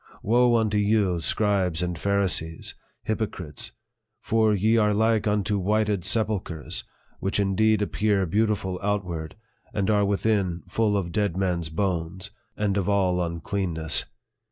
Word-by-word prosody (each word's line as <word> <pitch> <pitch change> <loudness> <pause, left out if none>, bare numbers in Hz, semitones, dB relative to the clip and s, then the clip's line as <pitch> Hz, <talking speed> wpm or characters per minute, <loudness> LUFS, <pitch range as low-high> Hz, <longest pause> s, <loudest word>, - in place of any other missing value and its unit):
Woe 120 +2 +4
unto 110 -2 +2
you, 100 -4 +2
scribes 95 -1 +1
and 90 -1 -2
Pharisees, 90 -3 -1 0.3
hyp 110 - -1
ocrites! 90 -9 -4 0.5
for 110 -2 +2
ye 105 +3 +2
are 105 -2 +3
like 110 0 +2
unto 105 0 +1
whited 105 -1 +1
sepulchres, 100 - -1 0.4
which 95 +2 -1
indeed 105 +2 +2
appear 100 -1 +1
beautiful 100 -1 0
outward, 90 -6 -2 0.4
but 100 0 +1
are 105 -1 +3
within 100 -3 0
full 105 -2 +1
of 90 -3 -3
dead 100 -4 0
men's 90 -4 -1
bones, 90 +2 -2 0.3
and 105 -2 0
of 100 -1 0
all 90 -3 +2
uncleanness. 85 -1 0
100 Hz, 130 wpm, -25 LUFS, 90-105 Hz, 0.5 s, Woe